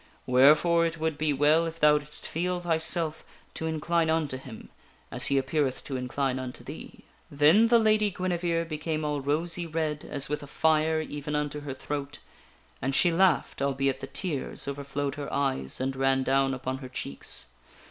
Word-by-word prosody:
Wherefore 150 +7 +5
it 165 0 -5
would 160 -1 -1
be 155 0 0
well 150 +4 +3
if 165 0 -7
thou 150 0 +5
didst 150 0 -6
feel 180 +2 -2
thyself 165 -1 0 0.3
to 160 - -3
incline 160 +1 0
unto 160 -4 0
him 130 -4 -10 0.4
as - - 0
he 140 - +2
appeareth 135 0 0
to 135 - -5
incline 130 +1 -1
unto 130 -1 -7
thee." - - -10 0.3
Then 155 +10 +5
the 235 0 +5
Lady 215 -2 +3
Guinevere 175 -2 -1
became 155 -1 -3
all 145 -1 -1
rosy 165 +5 0
red 155 -2 -2
as 140 -1 -2
with 150 +1 -3
a 145 - -9
fire 160 +2 +2
even 150 -1 -5
unto 150 0 -2
her 145 -2 -6
throat. 145 +1 -5 0.6
And 135 +2 -1
she 175 - +5
laughed, 170 -5 +2
albeit 135 -1 0
the 135 - -6
tears 150 -3 -3
overflowed 140 0 -3
her 140 - -5
eyes 135 - -1
and 135 +1 -2
ran 135 0 +2
down 135 0 +2
upon 130 0 -4
her 130 -2 -8
cheeks. 70 - -4
150 Hz, 175 wpm, -28 LUFS, 135-165 Hz, 0.6 s, Wherefore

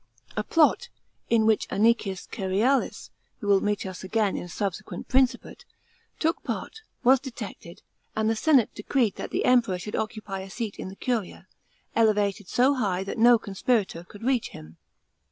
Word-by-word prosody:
A - - -1
plot, 330 +9 +3 0.4
in 225 -2 +3
which 220 -1 +2
Anicius 210 -3 +1
Cerealis, 210 +8 0 0.3
who 220 - -7
will 200 -1 +4
meet 205 -1 -1
us 185 -1 -7
again 205 +1 0
in - - -4
a - - -11
subsequent' 195 0 -4
piincipate, 260 -1 +1 0.5
took 325 +2 0
part, 445 - -5 0.2
was 260 +1 +6
detected, 225 -8 -9 0.3
and 220 0 +1
the 225 - +2
senate 265 -1 +3
decreed 220 -1 0
that - - -5
the - - -1
Emperor 235 -7 +3
should 210 +4 -6
occupy 215 -3 -4
a 190 0 -8
seat 215 0 -5
in - - -6
the 190 - -10
curia, 230 -4 -3 0.5
elevated 205 -3 +2
so 255 +8 +3
high 195 -8 -1
that 195 - -5
no 240 +1 +7
conspirator 200 -3 -1
could 205 +4 -13
reach 255 -2 +1
him. 80 +1 -12
215 Hz, 165 wpm, -26 LUFS, 195-245 Hz, 0.5 s, no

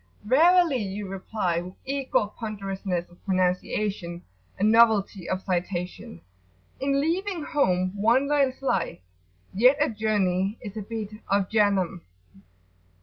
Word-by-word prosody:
"Verily," 325 - +4
you 200 0 -4
reply 190 -2 -2
with 180 +1 -9
equal 265 -6 -1
ponderousness 195 -5 -4
of 175 - -22
pronunciation 185 -1 -1 0.3
and 210 +3 +3
novelty 220 -5 +3
of 185 0 -2
citation, 180 - -3 0.6
"in 275 0 +1
leaving 345 +3 -1
home 185 -12 +1
one 230 +7 +3
learns 275 -2 +1
life, 195 -9 0 0.6
yet 250 +8 +5
a 295 0 +2
journey 205 -2 0
is 205 -3 -8
a 215 - -4
bit 215 0 -5 0.2
of 195 -1 +1
Jahannam." 200 -5 +2
205 Hz, 120 wpm, -26 LUFS, 185-255 Hz, 0.6 s, yet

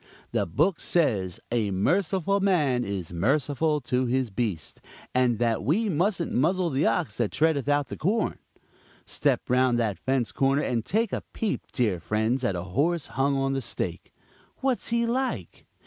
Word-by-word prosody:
The - - 0
book 170 - +1
says 105 - 0
'a 115 -4 +1
merciful 185 - +1
man 150 -11 +2
is 95 -5 -4
merciful 145 - +1
to 125 0 0
his 130 -2 0
beast,' 95 -8 -3 0.3
and 125 -2 +2
that 115 -3 0
we 200 - +1
mustn't 175 +1 0
'muzzle 170 +6 +2
the 135 +3 +2
ox 115 -1 0
that 120 -4 +1
treadeth 155 -4 +1
out 145 -1 +1
the - - -5
corn.' 210 +5 0 0.7
Step - - 0
round 125 -1 +3
that 110 -5 -1
fence 130 -3 0
corner, 135 +2 +2
and 120 -3 -1
take 220 - 0
a - - -1
peep, 220 -3 -2
dear 105 -8 0
friends, 110 +8 0
at 100 -7 +1
a 85 - -3
horse 145 - 0
hung 135 +1 +1
on 135 0 0
the 135 - -1
stake; 115 - -4 0.5
what's 260 -2 0
he 235 0 +1
like? 235 - -3
135 Hz, 165 wpm, -26 LUFS, 115-170 Hz, 0.7 s, round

